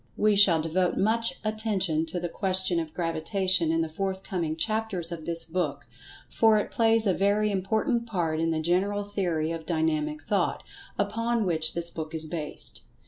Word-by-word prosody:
We 210 0 +3
shall 180 -6 +5
devote 175 +2 0
much 230 +3 +1
attention 195 -7 0
to 175 +2 -3
the 175 - -3
question 185 -1 +2
of 160 -2 -4
Gravitation 170 +1 +1
in 165 0 +1
the 165 - -1
forthcoming 190 -1 -3
chapters 205 -2 -1
of 165 -2 -6
this 170 -1 +2
book, 165 -4 -2 0.4
for 220 -1 +4
it 210 - -2
plays 225 -1 +3
a 195 - +3
very 205 +3 +2
important 220 +5 0
part 170 -7 -1
in 165 0 +1
the 160 -1 0
general 195 +5 +1
theory 175 -6 -1
of 165 -1 -6
Dynamic 155 -2 -1
Thought, 190 +3 0 0.3
upon 225 +2 0
which 160 -3 +1
this 170 0 -2
book 160 0 -6
is 160 0 -1
based. 155 -2 -4
180 Hz, 170 wpm, -27 LUFS, 160-205 Hz, 0.4 s, shall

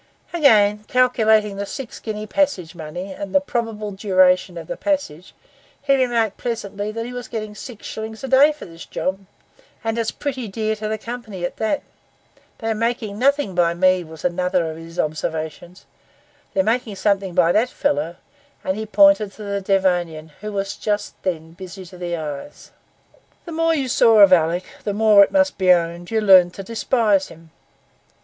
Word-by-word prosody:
Again, 210 -10 +4
calculating 220 -5 +3
the 200 - -3
six 265 0 -7
guinea 215 -1 -5
passage 210 - 0
money, 175 +3 -7
and 195 0 -7
the - - +7
probable 225 -6 -3
duration 185 -2 +2
of 165 - -7
the - - -5
passage, 190 - -3 0.4
he 275 -1 +2
remarked 235 -5 +1
pleasantly 210 -3 -4
that 230 +1 -4
he 245 - -7
was 245 0 -6
getting 215 -2 -5
six 225 +1 -10
shillings 220 +1 -7
a - - -3
day 270 +3 +6
for 300 - -10
this 165 -2 -11
job, 190 +1 -3 0.6
'and 225 +1 -1
it's 225 - 0
pretty 260 -5 -4
dear 215 +2 -2
to 215 0 -4
the 220 0 -2
company 220 -5 -6
at - - -5
that.' 220 +6 -1 0.7
'They 225 - -4
are - - +2
making 220 -2 -2
nothing 280 -5 +2
by 170 -1 +2
me,' 185 0 +3
was 160 0 -11
another 180 -1 0
of 160 - -9
his 165 +1 -11
observations; 160 +3 -4 0.7
'they're 285 - +3
making 230 -3 -1
something 195 -2 0
by 175 -2 +4
that 225 +6 +2
fellow.' 160 - -1 0.5
And 190 +2 -1
he 220 0 -4
pointed 225 -5 +4
to 215 - -10
the 200 -1 -3
Devonian, 175 -5 0
who 210 0 -5
was 195 -1 -3
just 210 -1 -2
then 165 -3 -3
busy 185 +1 -10
to 180 +1 -13
the 175 -1 -3
eyes. 150 - -7 0.7
The 340 - -8
more 330 0 +1
you 275 -4 -1
saw 225 -3 +5
of 195 -2 +8
Alick, 170 +1 +2 0.2
the 205 - -2
more, 210 -2 +7
it - - -1
must 285 -4 +2
be 185 -1 +5
owned, 170 0 +1
you 225 -1 0
learned 185 -3 +6
to 195 - -7
despise 220 -2 +1
him. 165 0 -16
205 Hz, 180 wpm, -21 LUFS, 180-230 Hz, 0.7 s, of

